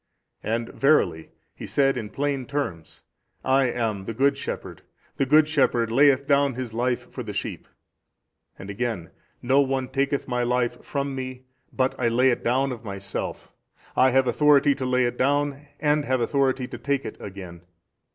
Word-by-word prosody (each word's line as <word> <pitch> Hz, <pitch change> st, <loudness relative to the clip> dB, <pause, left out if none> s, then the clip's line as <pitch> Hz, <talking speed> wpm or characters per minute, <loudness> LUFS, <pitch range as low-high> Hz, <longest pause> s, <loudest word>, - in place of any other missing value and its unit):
And 115 Hz, +1 st, -2 dB
verily 135 Hz, -, +2 dB, 0.2 s
He -, -, -9 dB
said 135 Hz, -1 st, +2 dB
in 110 Hz, -4 st, -4 dB
plain 140 Hz, -2 st, -2 dB
terms, 95 Hz, -, -4 dB, 0.4 s
I 135 Hz, +1 st, +3 dB
am 110 Hz, -5 st, -2 dB
the 115 Hz, -, -5 dB
Good 140 Hz, +4 st, +3 dB
Shepherd, -, -, -6 dB, 0.4 s
the 135 Hz, -, +1 dB
Good 150 Hz, +2 st, +5 dB
Shepherd 125 Hz, -6 st, +1 dB
layeth 140 Hz, +2 st, +4 dB
down 140 Hz, -2 st, +2 dB
His 125 Hz, -3 st, -5 dB
Life 120 Hz, +1 st, -1 dB
for -, -, -6 dB
His -, -, -7 dB
sheep, -, -, -4 dB, 0.9 s
and 95 Hz, +1 st, -8 dB
again, 105 Hz, -6 st, -3 dB, 0.3 s
No 130 Hz, +3 st, +4 dB
one 135 Hz, -2 st, -1 dB
taketh 140 Hz, 0 st, -1 dB
My 125 Hz, -1 st, -1 dB
life 120 Hz, 0 st, 0 dB
from 140 Hz, -1 st, -3 dB
Me 130 Hz, -1 st, -6 dB, 0.3 s
but 130 Hz, 0 st, 0 dB
I 120 Hz, -, +2 dB
lay 125 Hz, +3 st, +3 dB
it 120 Hz, -, -2 dB
down 130 Hz, +3 st, +1 dB
of 120 Hz, -2 st, -7 dB
Myself, 100 Hz, -2 st, -5 dB, 0.4 s
I 130 Hz, -, +5 dB
have 130 Hz, +1 st, +3 dB
authority 145 Hz, +2 st, +4 dB
to 130 Hz, -, -4 dB
lay 125 Hz, 0 st, +2 dB
it 120 Hz, 0 st, -3 dB
down 145 Hz, +1 st, 0 dB
and 150 Hz, -1 st, +2 dB
have 130 Hz, 0 st, +1 dB
authority 130 Hz, +1 st, +1 dB
to 120 Hz, -, -8 dB
take 140 Hz, +2 st, -1 dB
it -, -, -6 dB
again. 95 Hz, -4 st, -9 dB
130 Hz, 170 wpm, -25 LUFS, 120-140 Hz, 0.9 s, Good